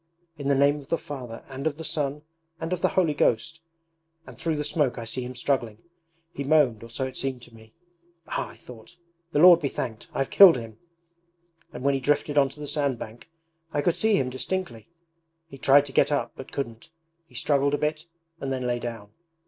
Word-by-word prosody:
"In 140 -3 -5
the 140 - +3
name 140 +2 +3
of 140 - -13
the 165 - 0
Father 125 -7 -8
and 135 +2 -4
of 150 -2 -2
the 160 - -7
Son 150 -2 -2 0.4
and 165 +2 -3
of 180 - -3
the - - +4
Holy 170 -5 +3
Ghost"... 145 +3 +1 0.7
and - - -11
through 165 -2 -2
the 150 - -2
smoke 145 -4 0
I 115 - -5
see 115 +3 -2
him 125 +1 -6
struggling. 120 -4 -1 0.6
He 140 - -4
moaned, 140 -6 +3
or 115 - -10
so 130 +3 -3
it 130 0 -7
seemed 130 -3 -3
to 120 - -15
me. 110 -1 -17 0.5
"Ah," - - -3
I - - -13
thought, 125 +8 -14 0.3
"the - - -1
Lord 175 +2 +9
be 145 - -1
thanked, 110 -4 -5
I've 135 - -2
killed 190 -8 +9
him!" 115 -2 -9 0.9
And 125 - -8
when 140 0 +3
he 135 - 0
drifted 145 +2 0
onto 140 0 +2
the 150 - -5
sand 140 -3 0
bank 115 +7 -10 0.4
I 145 - 0
could 175 - +2
see 220 -1 +3
him 130 -2 0
distinctly: 165 -1 -4 0.6
he 135 -4 -12
tried 140 +2 +5
to 140 - -7
get - - +3
up 145 - 0
but 130 - -10
couldn't. 115 -3 -5 0.4
He - - -21
struggled 140 0 +2
a - - -2
bit 155 +2 -2 0.3
and 135 - -4
then 130 -1 -2
lay 120 0 0
down. 115 -4 -7
140 Hz, 215 wpm, -26 LUFS, 125-150 Hz, 0.9 s, Lord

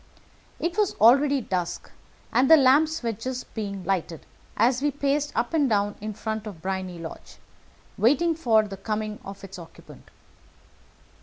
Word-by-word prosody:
It 345 +4 -2
was 415 -3 +1
already 275 +5 +5
dusk, 180 -5 -4 0.4
and 250 +3 +3
the 320 - +9
lamps 295 +3 +3
were 230 - 0
just 250 +4 -6
being 200 -4 -5
lighted 175 -3 -2 0.3
as 245 +4 +3
we 295 - +2
paced 285 +1 -1
up 235 +6 -1
and 295 -5 +2
down 205 -1 +1
in 215 0 -5
front 220 0 -4
of 195 -6 -8
Briony 185 0 -4
Lodge, 165 -1 -10 0.6
waiting 295 +9 +3
for 230 -9 +3
the 195 -1 -8
coming 215 +1 -4
of 195 0 -10
its 195 -1 -9
occupant. 165 -1 -14
220 Hz, 155 wpm, -25 LUFS, 195-280 Hz, 0.6 s, the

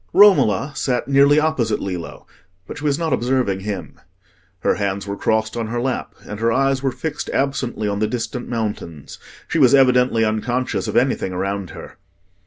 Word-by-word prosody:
Romola 150 - +5
sat 125 -3 -1
nearly 140 +2 +5
opposite 135 -9 0
Lillo, 90 -3 -6 0.4
but - - -8
she - - -10
was 145 -2 +1
not 165 -1 -1
observing 120 -6 0
him. 95 -6 -6 0.6
Her - - +2
hands 100 -1 -2
were 100 0 -4
crossed 110 +1 0
on 115 -2 -2
her 120 +2 -2
lap 130 +1 -3
and 105 - -7
her 115 +1 +2
eyes 135 +2 +1
were 135 -1 0
fixed 145 +4 -5
absently 130 -5 -1
on 100 0 -2
the 110 - +1
distant 120 +2 -4
mountains: 105 - -5 0.3
she 165 - -1
was 135 -1 +6
evidently 125 -3 +4
unconscious 120 +4 -1
of - - -1
anything 120 -7 +1
around 95 0 -3
her. - - -11
120 Hz, 175 wpm, -20 LUFS, 105-135 Hz, 0.6 s, was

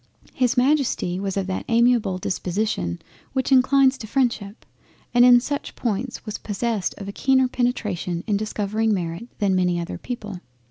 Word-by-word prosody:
—His 250 0 +1
Majesty 255 -9 +1
was 195 0 -3
of 195 - 0
that 190 0 -3
amiable 235 -4 +3
disposition 180 - -2 0.3
which 265 0 -1
inclines 265 +1 +4
to 220 - -7
Freindship, 230 -4 -1 0.5
and 245 0 +6
in 245 -1 +8
such 285 +3 -4
points 235 +2 -3
was 215 -1 -5
possessed 215 -1 -2
of 195 - -7
a - - -4
keener 260 +4 +2
penetration 210 -9 -2
in 210 - 0
discovering 215 +1 0
Merit 175 +4 -4
than 200 -3 +1
many 180 -1 +1
other 170 - -5
people. 210 -6 -6
220 Hz, 155 wpm, -23 LUFS, 195-250 Hz, 0.5 s, in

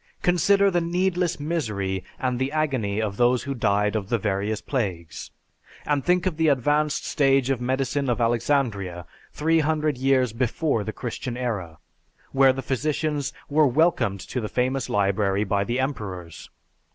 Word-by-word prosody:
Consider 195 +3 +4
the 175 -1 +1
needless 180 0 0
misery 105 - -2 0.2
and 125 -2 -1
the 130 +1 -1
agony 130 -10 -1
of 105 -2 -2
those 125 0 +3
who 140 - -3
died 105 -3 +1
of 100 -2 -2
the 120 - +2
various 105 +1 -1
plagues; 90 - -4 0.6
and 145 -2 0
think 180 0 +2
of 180 -4 -1
the 160 -1 +2
advanced 150 +2 +1
stage 135 -3 +2
of 125 -3 -1
medicine 130 +2 -1
of 120 - 0
Alexandria, 115 -7 0 0.3
three 160 +2 +2
hundred 155 -3 0
years 130 -3 +2
before 125 0 0
the 110 - -4
Christian 120 +1 -5
era, 100 -10 -3 0.5
where 135 -1 +5
the 130 0 -5
physicians 145 +1 -1 0.2
were 150 0 +4
welcomed 130 - +2
to 125 - -4
the 105 - -4
famous 130 +1 -1
library 100 0 +1
by 100 0 0
the 120 +5 -2
emperors. 95 - -5
130 Hz, 155 wpm, -24 LUFS, 105-150 Hz, 0.6 s, where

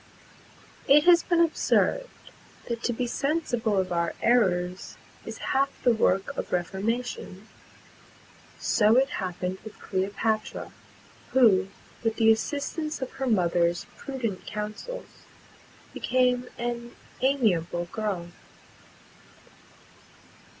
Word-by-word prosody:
It 295 +2 +7
has 345 0 +7
been 345 -1 +1
observed, - - +2 0.6
that 235 -1 -3
to - - +2
be 240 +1 -2
sensible 240 -5 0
of 185 -1 0
our 170 -1 0
errors 185 -6 +1 0.3
is - - -6 0.2
half 275 +1 +3
the 245 - +5
work 195 -3 +1
of - - -5
reformation. 195 +2 -3 1.1
[Pg - - -16 0.3
196]So - - +5
it 270 - +1
happened 185 0 -3
with 220 - -10
Cleopatra, 205 +3 -2 0.6
who 205 -8 +5 0.4
with 225 -1 +1
the 225 -1 +5
assistance 290 +7 -2
of 260 -1 -4
her 270 0 -4
mother's 175 -5 +2
prudent 240 -8 -4
counsels, 215 - -7 0.7
became 250 0 +1
an 240 0 -4 0.3
amiable 195 -11 +1
girl. 200 -6 -3
225 Hz, 105 wpm, -27 LUFS, 190-260 Hz, 1.1 s, It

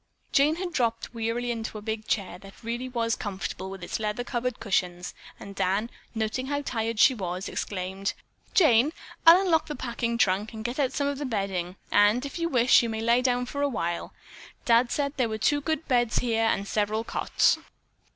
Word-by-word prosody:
Jane 295 +3 +4
had 355 0 -4
dropped 230 -4 -1
wearily 230 +1 -2
into 225 -2 -4
a - - -7
big 220 0 -4
chair 190 -4 -2
that 195 +3 -15
really 240 +3 -3
was 230 -2 0
comfortable 190 -1 -5
with 190 -2 -8
its - - -3
leather 215 +2 -2
covered 245 -1 -3
cushions, 180 -4 -1 0.3
and 200 - -9
Dan, 200 +5 0 0.2
noting 220 +4 -2
how 285 +1 -1
tired 225 -3 -2
she 260 - +7
was, 185 -4 -4
exclaimed: 190 0 -3 0.4
"Jane, 295 - +5 0.3
I'll 340 +3 +10
unlock 340 -5 +2
the 300 - -4
packing 235 -2 -2
trunk 210 +1 +1
and 220 0 -7
get 240 +4 -3
out 270 -3 +2
some 285 - -1
of 280 -1 -2
the 295 - -3
bedding, 190 -5 -2 0.2
and 210 +6 +4
if 280 - -6
you 335 0 0
wish, 250 -3 +5
you 235 - -2
may 220 0 -3
lie 235 +2 +3
down 250 -1 +1
for 285 +3 -4
a 285 - +2
while. 170 -8 -3 0.5
Dad 240 -1 +4
said 280 -1 -1
there 250 -4 +1
were 220 - -3
two 290 +7 +2
good 315 +1 -2
beds 240 -4 +2
here 225 -2 +1
and 200 -3 0
several 215 +2 0
cots." - - +2
230 Hz, 200 wpm, -27 LUFS, 205-255 Hz, 0.5 s, I'll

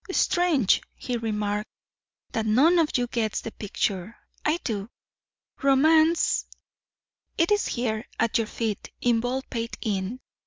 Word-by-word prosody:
"Strange," 345 - +3
he 250 - -4
remarked, 210 -2 -2 0.6
"that 220 -1 -1
none 295 +11 +5
of 320 -2 +3
you 245 - +1
gets 230 -3 -1
the 225 - -6
picture 200 0 -3 0.3
I 305 +2 +2
do. 210 -3 -3 0.7
Romance 315 +4 +4 0.9
it 335 +4 +2
is 415 0 +3
here 225 -3 -2
at 230 0 +2
your 225 - -1
feet 220 -3 -3
in 240 -2 +2
Baldpate 245 -1 -3
Inn. 205 +2 -2
235 Hz, 125 wpm, -26 LUFS, 215-275 Hz, 0.9 s, none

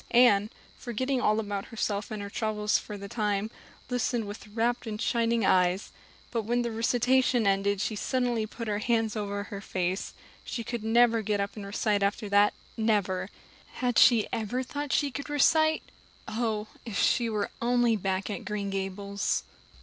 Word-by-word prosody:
Anne, 215 -4 +5 0.3
forgetting 255 +2 -1
all 215 +1 +3
about 205 -2 -3
herself 210 -2 -2
and 215 -2 -5
her 200 - -6
troubles 210 -1 0
for 210 - -8
the 200 0 -7
time, 210 0 -1 0.4
listened 245 -2 0
with 205 +1 -8
rapt 230 +3 -1
and 210 -1 -4
shining 230 -1 +1
eyes; 185 +1 +2 0.4
but 230 - 0
when 240 +3 0
the 235 - -2
recitation 245 +1 +2
ended 200 0 +2
she 215 +2 -1
suddenly 240 -1 0
put 230 +1 -7
her 205 -1 0
hands 225 -2 +1
over 200 -1 -2
her 200 -1 -7
face. 185 -1 -2 0.3
She 235 - -4
could 235 -1 -4
never 230 0 +4
get 210 -1 -1
up 200 0 -2
and 205 -2 -7
recite 205 0 0
after 200 +2 0
that 205 +1 +4 0.2
never. 200 -4 0 0.4
Had 245 -2 +1
she 230 -4 +6
ever 230 +4 -1
thought 285 +2 -4
she 285 -2 +2
could 280 +3 -6
recite? 315 +2 +3 0.4
Oh, 220 -2 -1 0.2
if 225 -4 -5
she 235 -2 +3
were 210 -2 -2
only 240 -1 +3
back 190 -1 -1
at - - -5
Green 205 -1 -3
Gables! 195 +1 -2
215 Hz, 170 wpm, -28 LUFS, 200-240 Hz, 0.4 s, she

